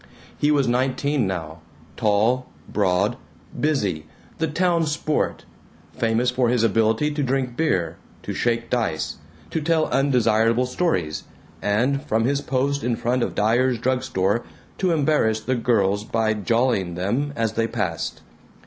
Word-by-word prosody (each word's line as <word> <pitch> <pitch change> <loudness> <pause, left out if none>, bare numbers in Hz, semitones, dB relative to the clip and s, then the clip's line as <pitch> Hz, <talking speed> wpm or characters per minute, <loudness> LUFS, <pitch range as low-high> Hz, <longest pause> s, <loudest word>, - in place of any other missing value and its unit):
He 145 - +1
was 145 -3 +3
nineteen 130 +1 +1
now, 80 -4 -4 0.4
tall, 110 +4 +2 0.2
broad, 95 +6 +1 0.4
busy, 100 - 0 0.3
the 160 - +1
"town 170 0 +1
sport," 150 0 -1 0.5
famous 115 +4 +1
for 125 -1 +1
his 120 -2 +2
ability 115 +6 +2
to 145 0 -2
drink 130 -2 -1
beer, 90 - 0 0.3
to - - -4
shake 115 0 -1
dice, 110 -11 -1 0.3
to 160 - -1
tell 160 0 +2
undesirable 120 -3 +3
stories, 125 - -1 0.4
and, 125 +7 +1
from 115 -3 0
his 140 +2 +1
post 140 +2 -1
in 120 0 +1
front 120 +2 0
of - - -2
Dyer's 120 +4 +2
drug 125 +2 0
store, 110 -3 0 0.4
to 185 - +2
embarrass 145 -9 +2
the 130 - -1
girls 105 -5 +1
by 110 0 0
"jollying" 105 -4 0
them 120 +11 -1
as 115 -1 0
they 115 0 0
passed. 100 -9 -3
120 Hz, 140 wpm, -23 LUFS, 110-140 Hz, 0.5 s, was